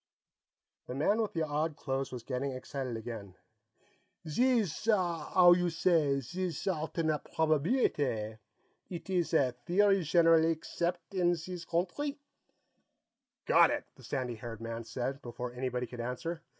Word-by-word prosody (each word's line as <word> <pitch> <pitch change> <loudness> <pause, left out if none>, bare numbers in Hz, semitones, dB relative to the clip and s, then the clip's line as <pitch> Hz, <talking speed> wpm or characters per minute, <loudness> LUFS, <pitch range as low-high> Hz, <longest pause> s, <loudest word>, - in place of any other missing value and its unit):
The 125 - -5
man 205 +11 +2
with 215 - -2
the 165 - 0
odd 150 +1 -1
clothes 135 -1 -3
was 125 -2 -6
getting 130 +2 -2
excited 130 -1 -4
again. 110 -5 -7 0.9
"Zees 225 - +1
'ow 175 -2 +4
you 180 0 +1
say 160 -4 +2
zees 180 +6 -4
alternate 160 -3 -1
probabeelitay; 145 - +1 0.5
eet 175 +1 -7
ees 175 -3 +1
a 130 -5 +4 0.2
theory 195 +2 +4
zhenerally 165 0 +5
accept' 170 +3 -3
een 175 -2 +3
zees 175 +1 -7
countree?" 185 - -1 1.3
"Got - - +6
it!" - - -1
the - - -17
sandy 130 -3 -2
haired 115 -1 -7
man 115 0 -5
said, 130 +4 -3
before 120 0 -6
anybody 125 0 -2
could 120 0 -7
answer. 145 +8 -4
155 Hz, 135 wpm, -32 LUFS, 125-175 Hz, 1.3 s, Got